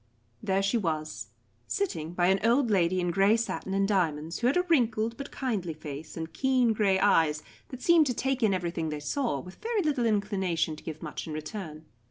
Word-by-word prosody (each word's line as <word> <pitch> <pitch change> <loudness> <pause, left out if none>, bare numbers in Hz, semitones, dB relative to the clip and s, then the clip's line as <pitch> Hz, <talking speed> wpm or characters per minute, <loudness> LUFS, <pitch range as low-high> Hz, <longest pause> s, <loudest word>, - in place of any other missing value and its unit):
There 195 0 0
she 200 +5 +2
was, 155 -5 -3 0.4
sitting 170 - -2
by 175 0 +1
an 195 +1 +3
old 235 +1 +3
lady 185 -2 +2
in 175 -1 0
grey 195 +5 +4
satin 195 -4 -3
and 195 0 +2
diamonds, 165 -5 0
who 240 - +2
had 275 - +2
a 360 - +3
wrinkled 230 -9 +1
but 275 +2 -7
kindly 200 - -3
face 150 +1 -8
and 160 0 -5
keen 255 -3 +2
grey 200 -3 +2
eyes 160 -6 +3 0.3
that 255 -1 -9
seemed 335 -3 +5
to 250 - 0
take 265 +1 -1
in 220 -3 +4
everything 170 -3 -2
they 150 -1 -4
saw, 190 - -1
with 180 +7 -11
very 445 -3 0
little 280 -6 +1
inclination 190 -6 0
to - - -14
give 155 -1 -7
much - - -6
in 155 - -5
return. 155 -1 -6
195 Hz, 205 wpm, -28 LUFS, 165-240 Hz, 0.4 s, seemed